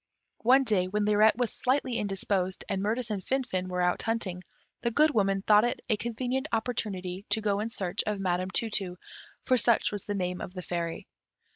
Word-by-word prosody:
One 260 Hz, +4 st, +5 dB
day, 205 Hz, -7 st, +2 dB
when 205 Hz, +2 st, 0 dB
Lirette 210 Hz, +1 st, +4 dB
was 245 Hz, -2 st, 0 dB
slightly 255 Hz, -2 st, 0 dB
indisposed, 195 Hz, -2 st, -1 dB
and 195 Hz, -1 st, -1 dB
Mirtis 220 Hz, +2 st, -1 dB
and 200 Hz, -3 st, -3 dB
Finfin 240 Hz, -9 st, -1 dB
were 180 Hz, -1 st, -1 dB
out 180 Hz, 0 st, +1 dB
hunting, 195 Hz, -6 st, -2 dB, 0.4 s
the 235 Hz, -, +1 dB
Good 300 Hz, +6 st, +4 dB
Woman 195 Hz, -5 st, +1 dB
thought 210 Hz, 0 st, +6 dB
it 240 Hz, -, -1 dB
a 220 Hz, -, +4 dB
convenient 245 Hz, +5 st, -2 dB
opportunity 200 Hz, -5 st, -2 dB
to 210 Hz, +2 st, +2 dB
go 205 Hz, -2 st, 0 dB
in 220 Hz, +2 st, -2 dB
search 195 Hz, -3 st, -1 dB
of 210 Hz, -1 st, -1 dB
Madam 185 Hz, -1 st, 0 dB
Tu 225 Hz, +4 st, -1 dB
tu, 185 Hz, -3 st, -2 dB, 0.5 s
for 255 Hz, -, +3 dB
such 235 Hz, 0 st, +3 dB
was 205 Hz, -2 st, -5 dB
the 205 Hz, -, -2 dB
name 180 Hz, -2 st, -2 dB
of 180 Hz, -, -7 dB
the 180 Hz, -, -5 dB
fairy. 170 Hz, -1 st, -3 dB
210 Hz, 195 wpm, -28 LUFS, 185-230 Hz, 0.5 s, thought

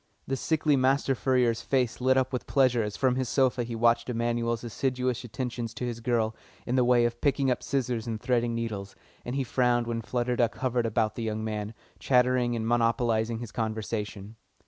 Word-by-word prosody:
The 135 Hz, -, -1 dB
sickly 150 Hz, +1 st, +1 dB
master 135 Hz, +1 st, +2 dB
furrier's 125 Hz, -3 st, +1 dB
face 125 Hz, -2 st, 0 dB
lit 130 Hz, +1 st, +3 dB
up 130 Hz, 0 st, +1 dB
with 125 Hz, -, -3 dB
pleasure 130 Hz, -4 st, +3 dB
as 105 Hz, -1 st, -3 dB
from 130 Hz, -1 st, +2 dB
his 130 Hz, -2 st, -1 dB
sofa 130 Hz, -2 st, +2 dB
he 115 Hz, 0 st, -5 dB
watched 115 Hz, +1 st, +2 dB
Emanuel's 115 Hz, -1 st, -1 dB
assiduous 125 Hz, +1 st, -1 dB
attentions 120 Hz, -1 st, -4 dB
to 125 Hz, -, -3 dB
his 120 Hz, -2 st, -4 dB
girl 115 Hz, -2 st, 0 dB, 0.3 s
in 125 Hz, -, -1 dB
the 130 Hz, -, +4 dB
way 120 Hz, -1 st, +4 dB
of 120 Hz, 0 st, -3 dB
picking 140 Hz, -2 st, +2 dB
up 125 Hz, -, -1 dB
scissors 125 Hz, -4 st, -2 dB
and 110 Hz, -2 st, -3 dB
threading 120 Hz, -1 st, 0 dB
needles, 105 Hz, -4 st, -4 dB, 0.3 s
and 120 Hz, -, -4 dB
he 135 Hz, -, 0 dB
frowned 120 Hz, -1 st, +1 dB
when 115 Hz, -1 st, -2 dB
Flutter 120 Hz, +2 st, -1 dB
Duck 120 Hz, -1 st, +1 dB
hovered 125 Hz, -2 st, 0 dB
about 110 Hz, -1 st, 0 dB
the 115 Hz, -, -6 dB
young 110 Hz, -1 st, -2 dB
man, 110 Hz, 0 st, -4 dB, 0.2 s
chattering 125 Hz, -1 st, +2 dB
and 110 Hz, -1 st, -2 dB
monopolising 115 Hz, -1 st, +1 dB
his 115 Hz, -1 st, -7 dB
conversation. 110 Hz, -1 st, -4 dB
120 Hz, 190 wpm, -28 LUFS, 115-125 Hz, 0.3 s, the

